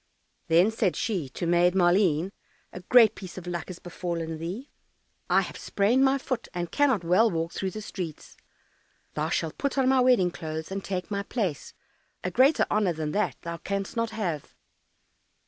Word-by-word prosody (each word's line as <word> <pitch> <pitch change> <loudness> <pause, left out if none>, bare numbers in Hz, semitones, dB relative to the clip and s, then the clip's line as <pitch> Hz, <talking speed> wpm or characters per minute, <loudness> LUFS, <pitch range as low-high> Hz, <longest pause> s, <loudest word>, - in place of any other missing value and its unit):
Then 175 +6 +4
said 215 -5 0
she 185 - -2
to 150 - -5
Maid 175 +1 +3
Maleen, 180 -1 +3 0.4
"A - - -6
great 220 +3 +6
piece 185 -4 -10
of 180 - -7
luck 175 -2 -4
has 185 - -7
befallen 170 -2 -4
thee. 190 - -6 0.6
I - - +5
have - - -6
sprained 225 +7 +2
my 270 0 +4
foot, 255 -3 -4
and 175 -1 -3
cannot 265 -10 +2
well 185 +7 +4
walk 165 -2 -2
through 190 - -2
the 215 +3 -7
streets; 175 -7 -7 0.8
thou 155 +1 -1
shalt 165 -1 -2
put 280 -1 -1
on 265 -1 +3
my 265 0 +4
wedding 245 -8 +4
clothes 160 0 -6
and 195 0 -4
take 185 0 -4
my 200 -1 -1
place; 200 - -3 0.5
a 180 - -2
greater 265 - +4
honour 205 -5 +2
than 155 -1 -3
that 210 - 0
thou 170 0 -4
canst 195 +2 -4
not 230 -1 0
have!" 185 -10 -4
185 Hz, 180 wpm, -27 LUFS, 170-220 Hz, 0.8 s, great